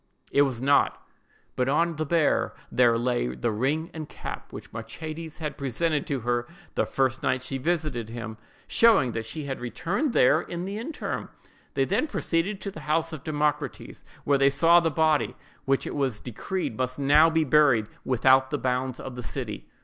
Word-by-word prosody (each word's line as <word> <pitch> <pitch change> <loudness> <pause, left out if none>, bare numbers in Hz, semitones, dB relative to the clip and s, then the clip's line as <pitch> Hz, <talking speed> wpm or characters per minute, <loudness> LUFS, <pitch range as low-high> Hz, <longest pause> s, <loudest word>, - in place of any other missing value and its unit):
It 140 - +4
was 135 -4 +1
not; 140 +3 +3 0.6
but 125 +1 +1
on 165 +3 +1
the 155 -1 -2
bier 165 -2 +2 0.2
there 120 -2 +4
lay 120 - 0
the 60 - -1
ring 145 - -1
and 155 -2 -6
cap - - -7
which - - -9
Machates 155 +8 -7
had 155 -3 -5
presented 145 +3 -1
to 140 -3 -2
her 120 +1 -1 0.3
the - - 0
first 130 -1 0
night 130 0 0
she 135 +1 -4
visited 150 -7 -1
him; 115 -2 -6 0.3
showing 215 - +4
that 115 0 -4
she 150 +7 -5
had 135 -2 -4
returned 180 - -2
there 150 +6 +5
in 175 +1 -5
the 200 +2 -4
interim. 295 +7 -4 0.5
They 135 - +2
then 215 - +1
proceeded 190 - -1
to 200 - -4
the 160 - -9
house 165 +1 +1
of 150 -4 -7
Democrates, 150 -1 -2 0.2
where 140 -1 +2
they 140 0 +5
saw 165 +5 +5
the 165 -1 +1
body, 155 -1 +2 0.3
which 135 0 +1
it - - -4
was 135 -7 -1
decreed 130 - -4
must 130 0 -1
now 145 +3 +5
be 160 0 +2
buried 140 -6 +4 0.2
without 130 +1 +4
the 145 - -1
bounds 130 -1 -1
of 130 - -7
the 125 - -6
city. - - -6
140 Hz, 185 wpm, -26 LUFS, 125-160 Hz, 0.6 s, there